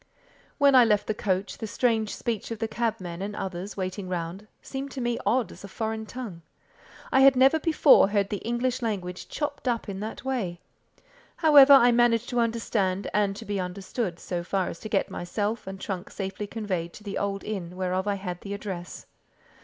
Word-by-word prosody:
When 280 Hz, -1 st, +5 dB
I 255 Hz, -2 st, +8 dB
left 210 Hz, -3 st, +2 dB
the 215 Hz, -, -1 dB
coach, 195 Hz, -2 st, -2 dB
the 220 Hz, -, -4 dB
strange 225 Hz, -1 st, 0 dB
speech 230 Hz, -4 st, -3 dB
of 230 Hz, -, -4 dB
the 225 Hz, +1 st, -2 dB
cabmen 215 Hz, -7 st, -3 dB
and 205 Hz, +1 st, -4 dB
others 190 Hz, +1 st, -5 dB
waiting 185 Hz, 0 st, -4 dB
round, 180 Hz, +3 st, -4 dB
seemed 270 Hz, +1 st, -6 dB
to 270 Hz, -, -5 dB
me 240 Hz, -1 st, -1 dB
odd 250 Hz, -1 st, +2 dB
as -, -, -13 dB
a -, -, -7 dB
foreign 220 Hz, +1 st, -4 dB
tongue. 220 Hz, -10 st, -7 dB, 0.7 s
I 265 Hz, -, +4 dB
had 270 Hz, 0 st, +7 dB
never 270 Hz, +5 st, +5 dB
before 310 Hz, -, +6 dB
heard 200 Hz, -1 st, +1 dB
the 205 Hz, -, 0 dB
English 240 Hz, +4 st, -1 dB
language 185 Hz, -6 st, -3 dB
chopped 290 Hz, -3 st, -4 dB
up 235 Hz, -2 st, 0 dB
in 195 Hz, -1 st, -5 dB
that 220 Hz, +4 st, -6 dB
way. 210 Hz, -10 st, -2 dB, 0.8 s
However, 295 Hz, -4 st, +8 dB
I 245 Hz, -3 st, +8 dB
managed 240 Hz, -1 st, +3 dB
to 245 Hz, -2 st, 0 dB
understand 220 Hz, -5 st, 0 dB
and 205 Hz, -1 st, +1 dB
to 225 Hz, -, -8 dB
be 205 Hz, -2 st, -2 dB
understood, 185 Hz, +1 st, -3 dB
so 175 Hz, -1 st, -4 dB
far 190 Hz, +1 st, -1 dB
as -, -, -8 dB
to 215 Hz, -, -7 dB
get 200 Hz, -, 0 dB
myself 205 Hz, +5 st, -3 dB
and 190 Hz, 0 st, -6 dB
trunk 190 Hz, -1 st, -5 dB
safely 195 Hz, +1 st, -5 dB
conveyed 190 Hz, -6 st, -3 dB
to 210 Hz, -, -12 dB
the 200 Hz, -1 st, -3 dB
old 200 Hz, -1 st, -2 dB
inn 180 Hz, -5 st, -5 dB
whereof 185 Hz, +1 st, -1 dB
I 205 Hz, -, +1 dB
had 180 Hz, -3 st, -5 dB
the 200 Hz, 0 st, -5 dB
address. 190 Hz, -4 st, -7 dB
210 Hz, 195 wpm, -27 LUFS, 190-235 Hz, 0.8 s, I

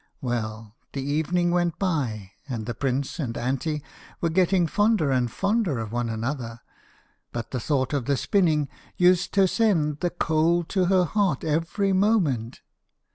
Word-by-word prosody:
Well, 110 Hz, -4 st, -4 dB, 0.2 s
the 135 Hz, -, -3 dB
evening 160 Hz, +5 st, +1 dB
went 175 Hz, -2 st, +1 dB
by, 125 Hz, -, -2 dB, 0.2 s
and 115 Hz, -4 st, -3 dB
the 120 Hz, -, -3 dB
prince 135 Hz, +5 st, -2 dB
and 120 Hz, -6 st, -3 dB
Anty 140 Hz, +4 st, -2 dB, 0.4 s
were 170 Hz, -, 0 dB
getting 180 Hz, +1 st, +3 dB
fonder 205 Hz, -4 st, +2 dB
and 125 Hz, -2 st, +1 dB
fonder 195 Hz, -, 0 dB
of 110 Hz, -2 st, -4 dB
one 120 Hz, 0 st, -1 dB
another, 115 Hz, 0 st, -4 dB, 0.7 s
but 120 Hz, -2 st, -5 dB
the 130 Hz, -, -2 dB
thought 130 Hz, +2 st, 0 dB
of 140 Hz, -4 st, -1 dB
the 140 Hz, -1 st, +1 dB
spinning 155 Hz, -, +2 dB, 0.3 s
used 180 Hz, 0 st, +4 dB
toe 195 Hz, -1 st, +4 dB
send 170 Hz, -8 st, +1 dB
the 175 Hz, -, 0 dB
cold 165 Hz, 0 st, +1 dB
to 190 Hz, -2 st, +1 dB
her 185 Hz, 0 st, +3 dB
heart 195 Hz, -6 st, 0 dB
every 165 Hz, +6 st, 0 dB
moment. 180 Hz, -, +1 dB
150 Hz, 155 wpm, -25 LUFS, 125-180 Hz, 0.7 s, used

